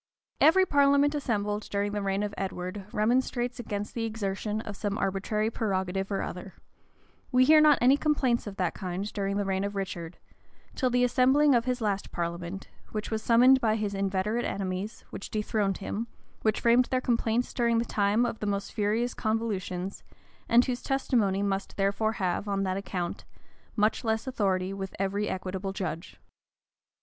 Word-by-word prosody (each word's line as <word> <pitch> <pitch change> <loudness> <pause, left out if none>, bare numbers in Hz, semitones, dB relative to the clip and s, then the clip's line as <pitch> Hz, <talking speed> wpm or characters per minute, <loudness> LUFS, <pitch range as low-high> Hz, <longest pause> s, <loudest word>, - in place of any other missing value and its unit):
Every 375 +4 +6
parliament 285 -1 +4
assembled 210 -7 -1
during 205 0 -1
the 205 0 -2
reign 195 +1 0
of 205 -1 -3
Edward, 190 0 -4
remonstrates 245 +2 0
against 205 -3 -4
the 230 - -2
exertion 215 -1 -2
of 210 -2 -7
some 205 0 -2
arbitrary 210 +3 -1
prerogative 195 -3 -2
or 195 - -1
other: 180 +1 -7 0.8
we 255 0 +5
hear 310 +2 +7
not 300 -3 +6
any 260 +3 +6
complaints 270 -7 +1
of 200 - -6
that 180 -3 -1
kind 190 +2 -4
during 200 -1 -1
the 205 - 0
reign 190 0 0
of 200 0 -3
Richard, 180 -3 -5 0.6
till 255 - 0
the 250 0 +2
assembling 265 +4 +4
of 235 -1 +2
his 250 -1 -1
last 200 -2 -1
parliament, 170 +2 -4 0.2
which 215 +1 -4
was 220 0 -1
summoned 250 +3 +5
by 220 -2 +2
his 210 -2 -2
inveterate 195 +4 -1
enemies, 195 +2 -4
which - - -7
dethroned 210 -2 -1
him, 210 +3 -4 0.3
which 215 -1 +1
framed 240 +1 +5
their 255 - 0
complaints 235 -1 0
during 235 -1 +2
the 230 - +1
time 210 +2 +2
of 230 -2 -3
the 210 - -3
most 200 -1 -2
furious 220 +3 0
convultions, 200 -4 -2 0.5
and 240 +1 +6
whose 250 -1 -2
testimony 225 -8 +1
must 195 -1 -2
therefore 200 +3 +1
have, 190 0 -1
on 195 -1 0
that 185 -1 -1
account, 180 -3 -4 0.5
much 215 +3 +1
less 220 0 0
authority 195 -7 0
with 195 -1 -6
every 200 +2 -1
equitable 190 +1 -4
judge. 165 - -5
210 Hz, 170 wpm, -28 LUFS, 195-235 Hz, 0.8 s, hear